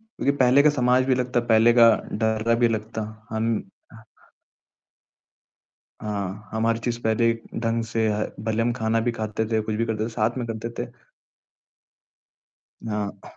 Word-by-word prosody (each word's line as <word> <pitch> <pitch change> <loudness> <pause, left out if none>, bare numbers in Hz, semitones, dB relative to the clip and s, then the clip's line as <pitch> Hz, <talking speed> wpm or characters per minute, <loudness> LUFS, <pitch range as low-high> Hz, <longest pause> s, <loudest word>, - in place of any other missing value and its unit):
क्योंकि 220 - -2
पहले 130 +2 +5
का 150 - +5
समाज 125 -2 +2
भी 130 - +3
लगता, 125 -1 0
पहले 115 +1 +6
का 115 -1 +8 0.3
डर 110 +1 +2
भी 120 -1 +4
लगता। 110 0 -3 0.3
हम 110 0 -1 2.5
हाँ, 100 -1 -4
हमारी 115 +1 +1
चीज़ 120 -1 -1
पहले 115 +1 +2 0.3
ढंग 115 0 0
से 115 0 -1
ह 105 +1 -1 0.2
भले 110 +1 0
हम 120 - +1
खाना 115 -1 0
भी 120 +1 0
खाते 110 0 -3
थे, 110 - +2
कुछ 110 0 -3
भी 115 +2 0
करते 110 -1 -2
थे, 115 - -3
साथ 110 +2 -1
में 120 - -3
करते 115 +1 -5
थे। - - -13 2.0
हाँ। 105 -2 -5
115 Hz, 155 wpm, -24 LUFS, 110-120 Hz, 2.5 s, का